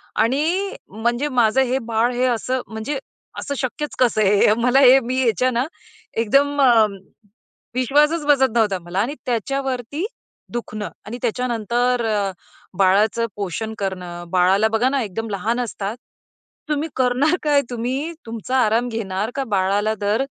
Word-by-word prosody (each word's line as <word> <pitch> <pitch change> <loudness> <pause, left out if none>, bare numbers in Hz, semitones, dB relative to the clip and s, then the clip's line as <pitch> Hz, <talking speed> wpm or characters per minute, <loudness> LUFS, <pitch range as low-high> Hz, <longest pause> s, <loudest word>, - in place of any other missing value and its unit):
आणि 325 - +1
म्हणजे 235 +7 -1
माझं 245 0 +3
हे 260 0 +1
बाळ, 230 +1 0
हे 250 +1 +1
असं 250 +2 -1
म्हणजे, 220 +6 -4 0.4
असं 280 - -4
शक्यच 275 +4 -3
कसं 235 -4 +3
आहे 205 0 +4
हे 210 - +5
मला 250 +3 +4
हे 265 0 +8
मी 255 +1 -1
ह्याच्या 250 +2 +2
ना 245 +3 0 0.5
एकदम 280 +6 +2
अ, 235 -5 +6 0.9
विश्वासच 295 +5 +2
बसत 270 -3 +4
नव्हता 205 -5 +2
मला 175 +3 -4
आणि 245 +8 0
त्याच्यावरती 265 - -2 0.5
दुखणं 215 -3 -4 0.2
आणि 235 +4 -6
त्याच्यानंतर 240 0 0
अ, 205 -3 0 0.5
बाळाचं 205 +4 +3
पोषण 205 +3 -3
करणं. 180 -3 -4
बाळाला 190 +4 +4
बघा 225 +3 +2
ना 275 -1 0
एकदम 220 +2 -5
लहान 220 +5 -1
असतात. 215 -1 -4 0.7
तुम्ही 300 +2 -1
करणार 260 +6 +2
काय? 290 -2 +4
तुम्ही 255 +7 -2
तुमचा 230 +3 -3
आराम 230 +3 +1
घेणार 215 -1 -3
का 275 - -1
बाळाला 200 +3 +1
दर, 210 +5 +1
240 Hz, 145 wpm, -21 LUFS, 215-265 Hz, 0.9 s, हे